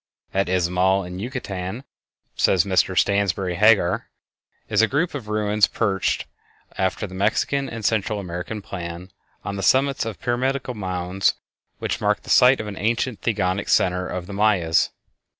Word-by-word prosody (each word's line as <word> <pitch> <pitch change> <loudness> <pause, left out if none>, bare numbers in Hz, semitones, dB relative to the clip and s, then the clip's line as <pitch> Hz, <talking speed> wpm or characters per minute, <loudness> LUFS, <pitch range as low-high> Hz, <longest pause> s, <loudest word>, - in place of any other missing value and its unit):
At 95 0 +1
Izamal, 90 +2 +2
in 90 +1 -7
Yucatan, 100 -2 -5 0.5
says 90 -3 +3
Mr 95 0 +1
Stansbury 100 -2 +1
Hagar, 100 -2 +3 0.6
is 105 0 +3
a 115 - +4
group 155 +6 0
of 130 -7 -6
ruins 105 -1 +2
perched, 100 -4 -1 0.5
after 95 +3 -1
the 95 - -10
Mexican 110 +8 0
and 115 -3 -6
Central 105 0 0
American 90 +3 -5
plan, 90 -1 -7 0.3
on 100 0 -3
the - - -3
summits 135 +7 +3
of 115 -3 -5
pyramidal 130 +1 -1
mounds 95 -2 -1 0.4
which - - -3
mark - - +1
the - - -5
site 125 +2 +6
of 110 - -4
an 105 -2 -7
ancient 115 +2 -1
theogonic 100 -3 -1
center 90 0 +2
of 90 -1 -5
the 100 - -8
Mayas. 100 -6 +2
100 Hz, 150 wpm, -23 LUFS, 90-115 Hz, 0.6 s, site